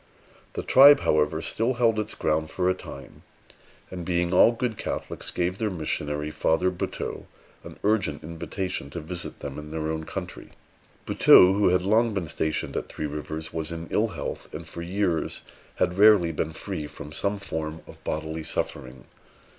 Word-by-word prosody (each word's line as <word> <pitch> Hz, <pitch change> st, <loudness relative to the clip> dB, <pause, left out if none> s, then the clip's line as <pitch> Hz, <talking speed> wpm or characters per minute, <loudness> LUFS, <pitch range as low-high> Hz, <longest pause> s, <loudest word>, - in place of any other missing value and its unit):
The -, -, -4 dB
tribe, 140 Hz, +2 st, +8 dB
however, 75 Hz, +1 st, +1 dB
still 115 Hz, +8 st, 0 dB
held 115 Hz, -2 st, +2 dB
its 105 Hz, 0 st, -4 dB
ground 80 Hz, 0 st, 0 dB
for 90 Hz, +2 st, -1 dB
a 95 Hz, -, +4 dB
time, 70 Hz, -7 st, -11 dB, 0.7 s
and, 90 Hz, -2 st, -5 dB
being 85 Hz, 0 st, 0 dB
all 100 Hz, -, +7 dB
good 120 Hz, -1 st, -2 dB
Catholics, -, -, -4 dB
gave 90 Hz, +2 st, -1 dB
their 110 Hz, -2 st, 0 dB
missionary, 75 Hz, -3 st, -2 dB
Father 90 Hz, +4 st, +1 dB
Buteux, 90 Hz, -, -5 dB, 0.4 s
an -, -, -10 dB
urgent 100 Hz, -9 st, +1 dB
invitation 85 Hz, 0 st, -4 dB
to 85 Hz, -, -6 dB
visit 85 Hz, +2 st, -6 dB
them -, -, -5 dB
in 75 Hz, 0 st, -9 dB
their 80 Hz, 0 st, -2 dB
own 80 Hz, 0 st, -4 dB
country. -, -, -7 dB, 0.5 s
Buteux, 90 Hz, +1 st, +7 dB
who 100 Hz, -1 st, +3 dB
had 90 Hz, 0 st, +2 dB
long 110 Hz, +2 st, +3 dB
been 90 Hz, -5 st, -2 dB
stationed 80 Hz, 0 st, -2 dB
at -, -, -3 dB
Three 75 Hz, -, -4 dB
Rivers, 80 Hz, +2 st, -5 dB
was 80 Hz, 0 st, -3 dB
in 85 Hz, 0 st, -5 dB
ill -, -, +2 dB
health, -, -, -6 dB
and 80 Hz, +1 st, -7 dB
for 85 Hz, -, -7 dB
years 90 Hz, -1 st, -1 dB, 0.3 s
had 90 Hz, +2 st, 0 dB
rarely 105 Hz, -5 st, +6 dB
been 80 Hz, 0 st, -3 dB
free 80 Hz, -3 st, -5 dB
from 75 Hz, 0 st, -10 dB
some 100 Hz, +7 st, -1 dB
form 80 Hz, -4 st, -5 dB
of -, -, -14 dB
bodily 80 Hz, +1 st, -3 dB
suffering. 65 Hz, -4 st, -4 dB
85 Hz, 170 wpm, -26 LUFS, 80-100 Hz, 0.7 s, tribe